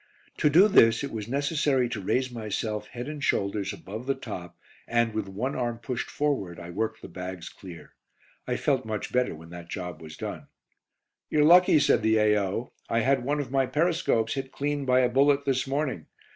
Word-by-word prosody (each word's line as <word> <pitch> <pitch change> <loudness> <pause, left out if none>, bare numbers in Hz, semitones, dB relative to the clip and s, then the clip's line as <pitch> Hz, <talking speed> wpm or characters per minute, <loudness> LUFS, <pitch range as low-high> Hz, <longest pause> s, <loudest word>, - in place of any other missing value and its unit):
To 150 - +3
do 175 +8 +7
this 115 - +5
it 140 - -4
was 110 -2 -5
necessary 140 -1 +1
to 105 - -4
raise 125 +6 0
myself 105 -2 -3
head 120 +1 -7
and 150 -1 -6
shoulders 100 -3 0
above 110 +6 -8
the 135 - +1
top 90 -9 -8 0.3
and, 115 -1 +1
with 110 -2 -2
one 105 +8 -3
arm 120 -2 -2
pushed 120 +1 -4
forward, 115 -13 -1
I 85 0 -8
worked 110 +5 -3
the - - -7
bags 90 -2 -7
clear. 90 -4 -12 0.5
I - - 0
felt 135 -3 +1
much 110 -3 -4
better 125 -6 +1
when 80 +2 -13
that 85 -1 -9
job 90 -4 -6
was 80 -1 -10
done. - - -6 0.8
"You're 150 -1 +3
lucky," 175 +1 +7
said - - +3
the 110 0 +3
A.O. 105 +1 +1 0.2
"I 115 - +2
had 130 +1 +2
one 145 +3 0
of 140 -3 -4
my 135 -1 +2
periscopes 150 -6 +1
hit 135 -1 -4
clean 145 0 -2
by 130 0 +4
a 125 - +4
bullet 140 +3 +3
this 135 -1 0
morning. 135 - -2
120 Hz, 195 wpm, -27 LUFS, 100-140 Hz, 0.8 s, do